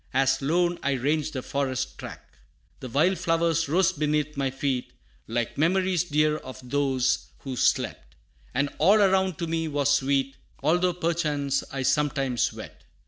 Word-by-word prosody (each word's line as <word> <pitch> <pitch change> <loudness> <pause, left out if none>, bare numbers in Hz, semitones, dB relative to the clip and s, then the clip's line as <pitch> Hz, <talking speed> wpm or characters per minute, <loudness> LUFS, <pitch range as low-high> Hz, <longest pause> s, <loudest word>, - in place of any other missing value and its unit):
As 135 0 +2
lone 175 +5 +1
I 140 - 0
ranged 150 +4 0
the 130 -3 -4
forest 135 -2 -2
track. - - -8 0.6
The 130 - -7
wild 170 +10 +2
flowers 165 -2 +1
rose 185 +4 +3
beneath 150 0 -1
my 135 -1 0
feet 135 -1 -2 0.3
Like 120 +3 -2
memories 180 +1 +2
dear 150 -1 +2
of 130 -3 -10
those 135 -1 +1
who 135 -2 -5
slept, - - 0 0.4
And 140 +3 0
all 195 +7 +5
around 190 -3 +3
to 170 - -2
me 165 0 -1
was 145 -2 +1
sweet, 135 0 0 0.3
Although, 175 +4 +2
perchance, 150 -5 -1
I 135 -1 -3
sometimes 135 -4 +1
wept. - - -11
145 Hz, 150 wpm, -26 LUFS, 135-165 Hz, 0.6 s, all